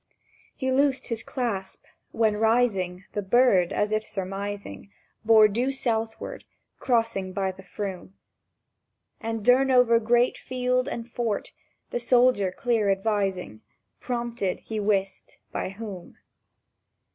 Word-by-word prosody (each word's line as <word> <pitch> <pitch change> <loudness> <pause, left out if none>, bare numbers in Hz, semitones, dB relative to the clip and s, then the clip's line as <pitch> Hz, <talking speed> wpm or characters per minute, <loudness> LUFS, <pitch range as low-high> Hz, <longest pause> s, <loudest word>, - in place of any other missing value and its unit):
He 260 -1 -1
loosed 275 0 +1
his 230 -1 -2
clasp; 210 -7 -4 0.3
when, 220 -2 +2
rising, 210 -5 +1
The 205 - -1
bird—as 205 -2 +3
if 215 0 +1
surmising— 200 +1 -5 0.3
Bore 220 -1 +7
due 235 +5 -1
to - - +1
southward, 225 -3 -3 0.4
crossing 230 -6 0
by 190 0 -1
the 185 - -13
Froom, 190 0 -6 1.0
And 225 -2 -4
Durnover 250 -2 +5
Great 240 +2 +2
Field 250 0 -1
and 235 -4 -5
Fort, 235 -3 -3 0.4
the - - -1
soldier 240 -5 +3
clear 220 +1 0
advising— 195 - -1 0.4
Prompted 235 -6 -3
he 220 -1 -4
wist 195 -2 -1
by - - -3
Whom. 195 -3 -9
220 Hz, 115 wpm, -26 LUFS, 195-240 Hz, 1.0 s, Bore